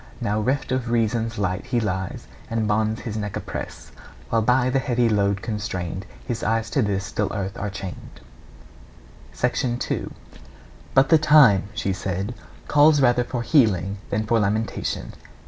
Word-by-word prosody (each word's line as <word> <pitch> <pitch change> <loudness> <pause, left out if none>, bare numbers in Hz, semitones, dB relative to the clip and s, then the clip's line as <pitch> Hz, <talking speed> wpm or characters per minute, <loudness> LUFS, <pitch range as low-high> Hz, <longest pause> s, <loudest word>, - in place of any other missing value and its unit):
Now, 105 +1 0
reft 130 +4 -1
of 130 -2 -1
reason's 115 -1 0
light, 100 +2 -2
he 125 -1 +1
lies, 95 -4 -3 0.2
And 110 -1 -1
bonds 110 +1 0
his 110 -4 -5
neck 105 -2 -3
oppress; - - -6 0.4
While 115 - +3
by 125 +3 +2
the 135 - +2
heavy 120 -1 +1
load 100 -2 +1
constrained, 95 -4 -4 0.2
His 120 -3 -3
eyes 115 0 0
to 140 - +2
this 100 -2 -1
dull 105 -1 -1
earth 100 -1 -3
are 105 - -3
chained. 95 -2 -8 1.2
II. 125 0 0 0.9
'But 135 0 +5
the 160 - +6
time,' 135 -11 +6
said 100 -5 -1 0.4
she, - - -19 0.3
'calls 150 0 +5
rather 125 -2 +4
for 120 -1 -4
healing 100 - +2
than 110 +2 -1
for 115 +2 +2
lamentation.' 105 0 -2
110 Hz, 150 wpm, -23 LUFS, 100-125 Hz, 1.2 s, the